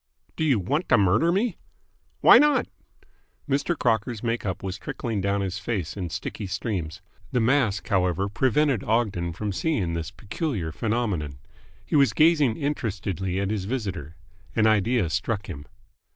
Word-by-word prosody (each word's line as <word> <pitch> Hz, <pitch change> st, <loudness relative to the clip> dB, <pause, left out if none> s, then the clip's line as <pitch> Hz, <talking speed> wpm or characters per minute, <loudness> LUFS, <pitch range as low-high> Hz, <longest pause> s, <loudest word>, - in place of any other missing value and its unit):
"Do -, -, -2 dB
you 140 Hz, -6 st, +3 dB
want 140 Hz, -, -1 dB
to -, -, +6 dB
murder 105 Hz, -, +3 dB
me?" 200 Hz, +1 st, 0 dB, 0.6 s
"Why -, -, +9 dB
not?" 295 Hz, -2 st, +4 dB, 0.8 s
Mr. 145 Hz, +4 st, 0 dB
Crocker's 115 Hz, -1 st, 0 dB
make 115 Hz, -2 st, -1 dB
up 95 Hz, +1 st, -3 dB
was 95 Hz, +1 st, -4 dB
trickling 115 Hz, -5 st, -3 dB
down 100 Hz, +1 st, 0 dB
his 95 Hz, 0 st, -3 dB
face 100 Hz, -7 st, -3 dB
in 90 Hz, -4 st, -4 dB
sticky 95 Hz, +4 st, -5 dB
streams. 90 Hz, -5 st, -4 dB, 0.3 s
The 125 Hz, -, +1 dB
mask, 115 Hz, -, +2 dB
however, 95 Hz, 0 st, +1 dB
prevented 130 Hz, +3 st, +1 dB
Ogden 100 Hz, -7 st, 0 dB
from 105 Hz, +5 st, -3 dB
seeing 100 Hz, -, -1 dB
this 85 Hz, 0 st, -3 dB
peculiar 105 Hz, -, -4 dB
phenomenon. 100 Hz, -, -2 dB, 0.5 s
He -, -, -2 dB
was 140 Hz, -6 st, +5 dB
gazing 150 Hz, -7 st, +4 dB
interestedly 100 Hz, -, -2 dB
at 100 Hz, +1 st, -1 dB
his 100 Hz, -3 st, -2 dB
visitor. 95 Hz, -, -4 dB, 0.4 s
An 110 Hz, -, +3 dB
idea 110 Hz, -1 st, +3 dB
struck 105 Hz, +3 st, -1 dB
him. 75 Hz, -7 st, -8 dB
105 Hz, 150 wpm, -25 LUFS, 95-125 Hz, 0.8 s, Why